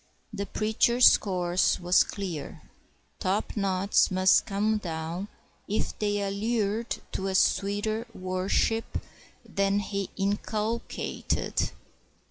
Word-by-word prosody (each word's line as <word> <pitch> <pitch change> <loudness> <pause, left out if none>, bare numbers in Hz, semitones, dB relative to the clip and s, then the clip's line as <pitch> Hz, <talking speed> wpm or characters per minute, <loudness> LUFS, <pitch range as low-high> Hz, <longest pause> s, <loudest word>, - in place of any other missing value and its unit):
The 200 -1 -3
preacher's 235 +3 +5
course 180 -2 +1
was 180 +1 +4
clear. 185 -7 -6 0.6
Topknots 195 0 +1
must 185 -1 +4
come 210 +2 +1
down 170 +1 -4 0.4
if 210 - -1
they 205 -1 0
allured 215 +2 -1
to 190 - -3
a 190 - -1
sweeter 205 +5 +1
worship 185 +4 -1 0.5
than 200 0 +1
he 200 -1 -2
inculcated. 210 +3 -1
200 Hz, 95 wpm, -28 LUFS, 185-215 Hz, 0.6 s, preacher's